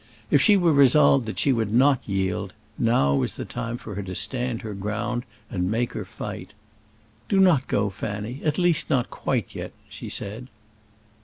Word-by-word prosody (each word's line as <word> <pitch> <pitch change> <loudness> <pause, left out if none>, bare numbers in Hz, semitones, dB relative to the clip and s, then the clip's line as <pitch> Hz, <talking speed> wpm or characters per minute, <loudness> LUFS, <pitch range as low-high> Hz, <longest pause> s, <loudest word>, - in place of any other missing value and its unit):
If 145 - +5
she 205 +8 +6
were 175 -4 +3
resolved 140 -2 +5
that 110 - -5
she 140 - +3
would 110 -4 -1
not 130 +1 +3
yield, 95 -2 -1 0.3
now 115 - +3
was 70 - 0
the - - -5
time 115 +1 -4
for 110 - -8
her 100 - -4
to 95 -2 -6
stand 125 0 -2
her 110 -2 -5
ground 105 +5 -3 0.2
and 90 -2 -2
make 115 +3 -1
her - - -5
fight. 95 +3 -8 0.7
"Do 195 - +3
not 170 -9 +4
go, 100 -1 0
Fanny; 105 +6 -5
at 150 -2 0
least 175 -3 +2
not 125 -3 +1
quite - - -2
yet," - - -6
she - - -8
said. 110 +5 -5
115 Hz, 180 wpm, -24 LUFS, 105-135 Hz, 0.7 s, she